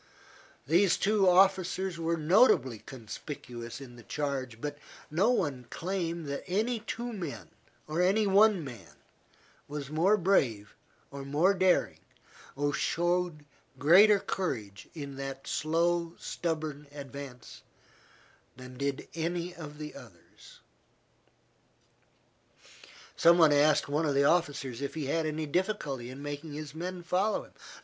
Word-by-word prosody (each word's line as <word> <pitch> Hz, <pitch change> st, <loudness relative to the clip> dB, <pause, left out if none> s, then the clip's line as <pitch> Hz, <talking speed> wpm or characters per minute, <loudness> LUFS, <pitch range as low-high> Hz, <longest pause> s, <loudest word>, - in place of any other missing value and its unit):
These 175 Hz, +4 st, +4 dB
two 200 Hz, -2 st, +3 dB
officers 185 Hz, -1 st, +3 dB
were 165 Hz, 0 st, 0 dB
notably 155 Hz, -, +4 dB
conspicuous 120 Hz, 0 st, -8 dB
in 125 Hz, -3 st, -11 dB
the -, -, -11 dB
charge, 130 Hz, -2 st, -3 dB
but 145 Hz, +2 st, -5 dB, 0.3 s
no 185 Hz, +9 st, +3 dB
one 145 Hz, -, 0 dB
can 120 Hz, -, -21 dB
claim 170 Hz, -2 st, -3 dB
that 140 Hz, -1 st, -4 dB
any 220 Hz, +6 st, 0 dB
two 235 Hz, +2 st, -5 dB
men, 175 Hz, -8 st, -6 dB, 0.4 s
or 155 Hz, +3 st, -1 dB
any 200 Hz, +4 st, +3 dB
one 200 Hz, -2 st, +5 dB
man, 115 Hz, -, -10 dB, 0.7 s
was 145 Hz, -1 st, -6 dB
more 180 Hz, +7 st, +3 dB
brave 130 Hz, -, +1 dB, 0.4 s
or 140 Hz, 0 st, -7 dB
more 150 Hz, +8 st, +3 dB
daring, 185 Hz, -1 st, +2 dB, 0.6 s
or 145 Hz, +1 st, 0 dB
showed 175 Hz, -1 st, 0 dB, 0.3 s
greater 190 Hz, +9 st, +7 dB
courage 115 Hz, -, -4 dB
in 140 Hz, -3 st, -7 dB
that 135 Hz, 0 st, -6 dB
slow, 170 Hz, +2 st, 0 dB
stubborn 155 Hz, -3 st, -4 dB
advance, 140 Hz, -3 st, -9 dB, 1.0 s
than 125 Hz, 0 st, -11 dB
did 140 Hz, -1 st, -2 dB
any 170 Hz, +2 st, -2 dB
of 150 Hz, -3 st, -9 dB
the 150 Hz, 0 st, -7 dB
others. 100 Hz, -9 st, -15 dB, 2.5 s
Some 170 Hz, +1 st, +6 dB
one 160 Hz, -3 st, +6 dB
asked 145 Hz, +1 st, +4 dB
one 150 Hz, +3 st, 0 dB
of 145 Hz, -, 0 dB
the 140 Hz, -, +4 dB
officers 140 Hz, -6 st, +1 dB
if 140 Hz, -, -4 dB
he 155 Hz, -3 st, -3 dB
had 160 Hz, +3 st, 0 dB
any 155 Hz, 0 st, -2 dB
difficulty 150 Hz, -, -2 dB
in 135 Hz, +2 st, -9 dB
making 145 Hz, +1 st, -6 dB
his 150 Hz, -1 st, -7 dB
men 175 Hz, +2 st, -5 dB
follow 185 Hz, +5 st, 0 dB
him. -, -, -18 dB
155 Hz, 130 wpm, -30 LUFS, 140-180 Hz, 2.5 s, greater